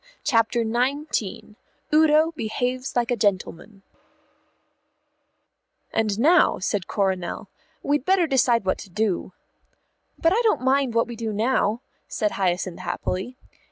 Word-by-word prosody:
CHAPTER 230 Hz, 0 st, +2 dB
XIX 245 Hz, 0 st, -2 dB, 0.4 s
UDO 310 Hz, +1 st, +5 dB
BEHAVES 250 Hz, +3 st, -3 dB
LIKE 245 Hz, 0 st, 0 dB
A -, -, +2 dB
GENTLEMAN 200 Hz, -1 st, -2 dB, 2.1 s
"And 215 Hz, -2 st, 0 dB
now," 335 Hz, +8 st, +4 dB
said 190 Hz, 0 st, -2 dB
Coronel, 190 Hz, -3 st, -2 dB, 0.3 s
"we'd 290 Hz, -2 st, 0 dB
better 375 Hz, +1 st, +3 dB
decide 245 Hz, -7 st, +2 dB
what 185 Hz, -, 0 dB
to -, -, -10 dB
do." 190 Hz, -1 st, -2 dB, 0.8 s
"But 330 Hz, +2 st, +2 dB
I 455 Hz, -, +2 dB
don't 445 Hz, -, +2 dB
mind 260 Hz, -2 st, +1 dB
what 230 Hz, -, +3 dB
we 240 Hz, -, -8 dB
do 225 Hz, -1 st, -4 dB
now," 220 Hz, +1 st, 0 dB, 0.3 s
said 210 Hz, -3 st, -1 dB
Hyacinth 180 Hz, -2 st, -1 dB
happily. 195 Hz, +8 st, -4 dB
230 Hz, 120 wpm, -24 LUFS, 205-270 Hz, 2.1 s, UDO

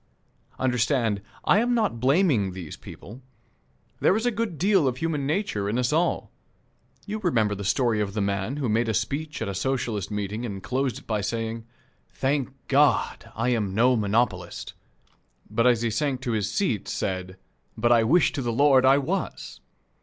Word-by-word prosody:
Understand, 120 Hz, -4 st, +1 dB, 0.2 s
I 205 Hz, -, +5 dB
am 240 Hz, +2 st, +1 dB
not 215 Hz, -, 0 dB
blaming 130 Hz, -, +2 dB
these 90 Hz, -5 st, -7 dB
people. 115 Hz, +8 st, -11 dB, 0.8 s
There -, -, +4 dB
is 225 Hz, -, -2 dB
a 245 Hz, -, +3 dB
good 215 Hz, -6 st, -3 dB
deal 190 Hz, -2 st, +3 dB
of 125 Hz, -1 st, -1 dB
human 150 Hz, -3 st, -1 dB
nature 145 Hz, -, -1 dB
in 110 Hz, -, -1 dB
us 125 Hz, +3 st, +1 dB
all. 170 Hz, +3 st, 0 dB, 0.7 s
You 215 Hz, +1 st, -4 dB
remember 115 Hz, -, +1 dB
the 100 Hz, 0 st, -5 dB
story 110 Hz, +2 st, +1 dB
of 100 Hz, -1 st, -3 dB
the -, -, -1 dB
man 100 Hz, +6 st, -1 dB
who 140 Hz, -4 st, -1 dB
made 115 Hz, +1 st, +1 dB
a 110 Hz, -, 0 dB
speech 145 Hz, +7 st, -2 dB
at -, -, -4 dB
a 100 Hz, -, -3 dB
Socialist 115 Hz, -3 st, -2 dB
meeting, 105 Hz, +2 st, -3 dB
and 100 Hz, -5 st, -5 dB
closed 130 Hz, 0 st, -1 dB
it -, -, -13 dB
by 110 Hz, -2 st, -1 dB
saying, 115 Hz, +2 st, -3 dB, 0.4 s
"Thank 135 Hz, 0 st, -1 dB, 0.2 s
God, 140 Hz, +1 st, +2 dB
I -, -, 0 dB
am 105 Hz, -6 st, 0 dB
no 125 Hz, +3 st, +4 dB
monopolist," 105 Hz, -4 st, -1 dB, 0.8 s
but 115 Hz, +3 st, +2 dB
as 120 Hz, -2 st, +3 dB
he 115 Hz, -, 0 dB
sank 135 Hz, +2 st, -1 dB
to 125 Hz, -3 st, -2 dB
his 105 Hz, -2 st, -1 dB
seat 115 Hz, -, -1 dB
said, 95 Hz, -1 st, -3 dB, 0.4 s
"But 120 Hz, +2 st, +2 dB
I 115 Hz, -1 st, +5 dB
wish 160 Hz, +10 st, +4 dB
to 145 Hz, -, -3 dB
the 120 Hz, -2 st, -1 dB
Lord 135 Hz, +1 st, +4 dB
I 135 Hz, +1 st, +6 dB
was!" 160 Hz, +8 st, -3 dB
120 Hz, 180 wpm, -25 LUFS, 105-145 Hz, 0.8 s, I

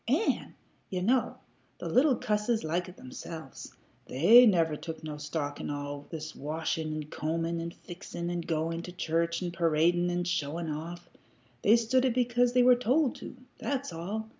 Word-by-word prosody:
An', 305 Hz, -, 0 dB, 0.3 s
ye 185 Hz, -, -2 dB
know, 240 Hz, +7 st, +1 dB, 0.4 s
the -, -, -6 dB
little 265 Hz, +1 st, +4 dB
cusses 220 Hz, -1 st, 0 dB
like 175 Hz, +3 st, -1 dB
it 180 Hz, -, -14 dB
themselves. 135 Hz, +2 st, -9 dB, 0.3 s
They 220 Hz, -, +7 dB
never 165 Hz, -6 st, +3 dB
took 160 Hz, +1 st, -7 dB
no 150 Hz, -1 st, -5 dB
stock 150 Hz, -1 st, -4 dB
in -, -, -4 dB
all 145 Hz, 0 st, -5 dB
this 155 Hz, -1 st, -6 dB
washin' 155 Hz, +1 st, -2 dB
an' 155 Hz, -, -3 dB
combin' 165 Hz, +3 st, -2 dB
an' 170 Hz, -, -3 dB
fixin' 175 Hz, 0 st, -7 dB
an' 175 Hz, 0 st, -2 dB
goin' 165 Hz, 0 st, -2 dB
to 180 Hz, -, -8 dB
church 170 Hz, 0 st, -1 dB
an' 175 Hz, -, -2 dB
paradin' 170 Hz, +1 st, +2 dB
an' 175 Hz, 0 st, 0 dB
showin' 165 Hz, -2 st, -2 dB
off. 170 Hz, +3 st, -6 dB, 0.5 s
They 215 Hz, -, +6 dB
stood 235 Hz, +3 st, +2 dB
it 255 Hz, -3 st, +1 dB
because 245 Hz, 0 st, +2 dB
they 250 Hz, 0 st, +5 dB
were 250 Hz, 0 st, +8 dB
told 250 Hz, +3 st, +2 dB
to. -, -, -9 dB, 0.2 s
That's 280 Hz, -8 st, -2 dB
all. 205 Hz, +7 st, -4 dB
170 Hz, 170 wpm, -29 LUFS, 160-225 Hz, 0.5 s, were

